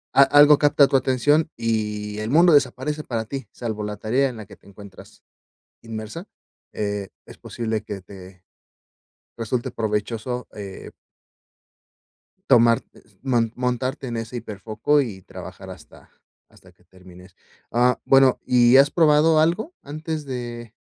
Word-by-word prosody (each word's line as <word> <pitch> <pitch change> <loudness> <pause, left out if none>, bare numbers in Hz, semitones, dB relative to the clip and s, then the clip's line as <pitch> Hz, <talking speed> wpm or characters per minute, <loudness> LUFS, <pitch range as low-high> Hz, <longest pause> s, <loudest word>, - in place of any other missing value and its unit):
a - - +7
algo 145 +1 +6
capta 145 -1 +5
tu - - -1
atención 135 +4 +2
y 105 -2 -3
el 110 +1 -4
mundo 170 +4 +5
desaparece 145 +2 +1
para 115 -5 -3
ti, 135 0 -7
salvo 110 -3 -5
la 105 0 -5
tarea 130 +5 0
en 120 - -9
la 110 - -9
que 100 - -14
te - - -24
encuentras, 100 -1 -15 0.6
inmersa, 115 - -8 0.4
eh, 100 -2 -3 0.2
es - - -13
posible 110 -3 -4
que 105 -2 -7
te, 95 -1 -14 0.9
resulte 115 +1 -3
provechoso, 115 +3 -3
eh 100 -2 -9 1.6
tomar, 115 -1 +5
e - - -18 0.3
mon 115 -2 +1
montarte 125 +1 -2
en 120 -1 -4
ese 115 +2 -5
hiperfoco 110 +6 -1
y 105 -8 -6
trabajar - - -11
hasta - - -14 0.4
hasta - - -20
que - - -31
termines. 90 0 -17 0.4
Ah, 125 +1 +2
bueno, 135 -1 +4
¿y 125 0 +5
has 140 +1 +5
probado 155 -1 +4
algo 175 - 0
antes 155 +1 -5
de 120 -3 -7
120 Hz, 140 wpm, -22 LUFS, 105-140 Hz, 1.6 s, a